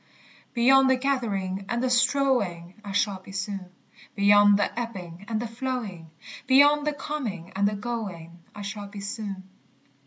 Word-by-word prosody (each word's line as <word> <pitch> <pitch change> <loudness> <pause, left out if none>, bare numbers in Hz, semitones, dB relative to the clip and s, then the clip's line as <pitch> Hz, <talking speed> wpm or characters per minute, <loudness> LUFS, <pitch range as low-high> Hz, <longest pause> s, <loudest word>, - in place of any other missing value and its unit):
Beyond 265 +3 +5
the 260 - +5
gathering 200 -8 -2
and 240 +1 -1
the 255 - +1
strowing 240 -9 +1
I 200 - -6
shall 200 -1 0
be 190 - -13
soon; 195 -1 -4 0.5
Beyond 205 0 +6
the 205 +3 -1
ebbing 190 -6 -7
and 220 -2 -1
the 240 - -3
flowing. 225 -8 -5 0.4
Beyond 290 +3 +5
the 300 - +1
coming 245 - -5
and 200 +1 +2
the 210 - -1
going, 200 -7 -5 0.2
I 205 - -7
shall 205 0 -6
be 200 0 -9
soon. 200 -1 -5
205 Hz, 155 wpm, -26 LUFS, 195-250 Hz, 0.5 s, Beyond